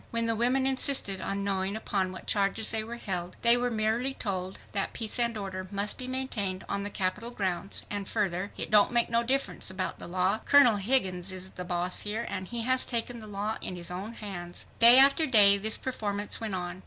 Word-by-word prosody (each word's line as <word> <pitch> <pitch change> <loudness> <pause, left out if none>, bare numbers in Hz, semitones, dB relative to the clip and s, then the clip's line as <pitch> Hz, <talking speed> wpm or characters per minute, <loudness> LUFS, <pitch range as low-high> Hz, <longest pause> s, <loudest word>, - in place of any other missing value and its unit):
When 230 0 -1
the 230 0 0
women 250 +4 +1
insisted 260 -7 +3
on 200 0 -3
knowing 195 0 -2
upon 195 -4 -2
what 185 - -10
charges 200 +1 0
they 220 -1 -1
were 230 +2 -7
held, 180 -5 -5
they 235 0 +7
were 245 0 -1
merely 230 +4 -1
told 190 -3 -4
that 195 -1 -1
"peace 225 +1 0
and 235 -2 0
order 190 -2 -6
must 200 +1 -1
be 255 - -5
maintained 230 -8 -3
on 200 - -3
the 205 - -4
Capitol 200 +4 -3
grounds," 195 -4 -4
and 205 -1 -5
further, 195 -2 -2
"It - - -3
don't 210 +1 +5
make 235 -1 +1
no 230 0 +2
difference 265 -1 0
about 185 0 -4
the - - -9
law, 185 +4 0
Colonel 275 -6 +5
Higgins 190 -5 +1
is 185 0 -4
boss 180 0 -2
here, 215 +3 -3
and 185 -1 -5
he 235 -1 -4
has 255 +2 +4
taken 235 0 -3
the 215 - -11
law 210 +2 -4
in 180 - -4
his 175 0 -5
own 195 +6 -6
hands." 175 -6 -7
Day 235 +2 +10
after 280 +4 +6
day 200 -5 +6
this 215 +2 +1
performance 210 -5 -4
went 215 -4 -3
on. 180 0 -5
205 Hz, 210 wpm, -28 LUFS, 190-235 Hz, -, Day